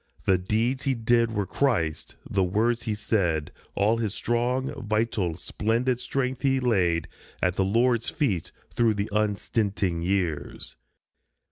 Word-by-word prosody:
The 95 -2 +4
deeds 115 +8 0
he 135 -1 +2
did 115 0 +3
were 105 -3 -1
Christ's, 90 - 0
the 95 -1 +1
words 110 +6 +1
he 110 -2 -2
said, 90 -8 0 0.2
All 105 +3 +3
his 110 -3 -2
strong, 125 +3 0
vital, 110 -6 0
splendid 115 +6 0
strength 130 -1 -2
he 135 -1 +2
laid 90 -10 +1 0.3
At 90 - +1
the 95 - +1
Lord's 115 +4 +2
feet 100 - -1 0.2
through 115 -2 +3
the 100 +1 -2
unstinting 100 -4 0
years. 85 -4 -2
110 Hz, 135 wpm, -26 LUFS, 95-120 Hz, 0.3 s, The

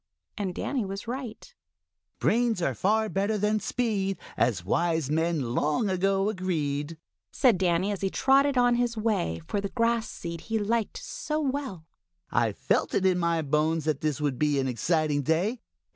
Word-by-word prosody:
And 195 -4 -3
Danny 265 -5 -1
was 195 +3 -6
right. 245 -2 -6 0.6
"Brains 235 -1 +2
are 170 - 0
better 205 -1 +1
far - - 0
than 210 +1 +1
speed 205 -6 -1 0.2
As 110 -6 +1
wise 160 - +1
men 160 -6 0
long 155 - +1
ago 195 +1 +1
agreed," 160 -6 -2 0.3
said 240 -9 +3
Danny, 185 +2 +2
as 200 - -4
he 195 - +1
trotted 275 +4 +3
on 245 -1 +4
his 240 -1 0
way 145 - 0
for 200 - -2
the 200 - -3
grass 230 0 +1
seed 170 -1 -6
he 225 -1 -2
liked 220 +1 -1
so - - -3
well. 265 - -3 0.5
"I - - +2
felt - - 0
it 190 - +2
in 185 -1 +3
my 170 -2 +1
bones 155 +2 +1
that 155 -3 0
this 150 -3 -1
would 140 -4 -1
be 150 -1 +2
an 135 - 0
exciting 150 +4 +1
day. 180 - 0
190 Hz, 170 wpm, -27 LUFS, 155-225 Hz, 0.6 s, on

